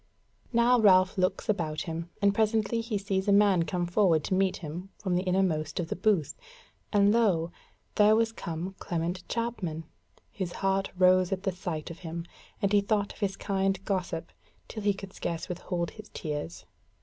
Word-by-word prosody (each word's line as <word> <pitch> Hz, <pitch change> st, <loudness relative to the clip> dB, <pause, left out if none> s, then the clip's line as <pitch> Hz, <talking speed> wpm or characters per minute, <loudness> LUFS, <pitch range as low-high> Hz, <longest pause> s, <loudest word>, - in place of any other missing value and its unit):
Now 240 Hz, +1 st, +4 dB
Ralph 185 Hz, -3 st, +5 dB
looks 185 Hz, -1 st, 0 dB
about 155 Hz, -8 st, -1 dB
him, 165 Hz, +1 st, -5 dB
and 200 Hz, 0 st, +5 dB
presently 220 Hz, +1 st, +1 dB
he 225 Hz, -2 st, -2 dB
sees 195 Hz, -1 st, -2 dB
a -, -, +4 dB
man 200 Hz, -4 st, +5 dB
come 175 Hz, +2 st, -1 dB
forward 175 Hz, -3 st, +3 dB
to -, -, -2 dB
meet 190 Hz, 0 st, +2 dB
him 175 Hz, +4 st, -7 dB
from 185 Hz, -3 st, -2 dB
the 175 Hz, -, +2 dB
innermost 180 Hz, -5 st, 0 dB
of 165 Hz, -2 st, -2 dB
the -, -, -2 dB
booth, 180 Hz, -6 st, +1 dB, 0.6 s
and 205 Hz, 0 st, +4 dB
lo! 185 Hz, -8 st, +2 dB, 0.4 s
there 210 Hz, +1 st, +5 dB
was 225 Hz, 0 st, +2 dB
come 175 Hz, -2 st, -5 dB
Clement 175 Hz, +2 st, -3 dB
Chapman. 210 Hz, -9 st, -3 dB, 0.5 s
His 180 Hz, -3 st, -4 dB
heart 195 Hz, 0 st, 0 dB
rose 185 Hz, 0 st, +5 dB
at 190 Hz, 0 st, -2 dB
the 190 Hz, -, +1 dB
sight 175 Hz, -4 st, -5 dB
of 170 Hz, -, -10 dB
him, 170 Hz, -1 st, -6 dB, 0.4 s
and 200 Hz, +1 st, +2 dB
he 205 Hz, -, +5 dB
thought 205 Hz, 0 st, 0 dB
of -, -, -18 dB
his 195 Hz, -2 st, -1 dB
kind 195 Hz, 0 st, 0 dB
gossip 180 Hz, -5 st, -2 dB, 0.4 s
till 220 Hz, -, -6 dB
he 205 Hz, -1 st, +2 dB
could 195 Hz, -1 st, -9 dB
scarce 165 Hz, -1 st, -4 dB
withhold 175 Hz, -1 st, -3 dB
his 215 Hz, -1 st, -12 dB
tears. 85 Hz, -, -5 dB
190 Hz, 180 wpm, -29 LUFS, 170-205 Hz, 0.6 s, Ralph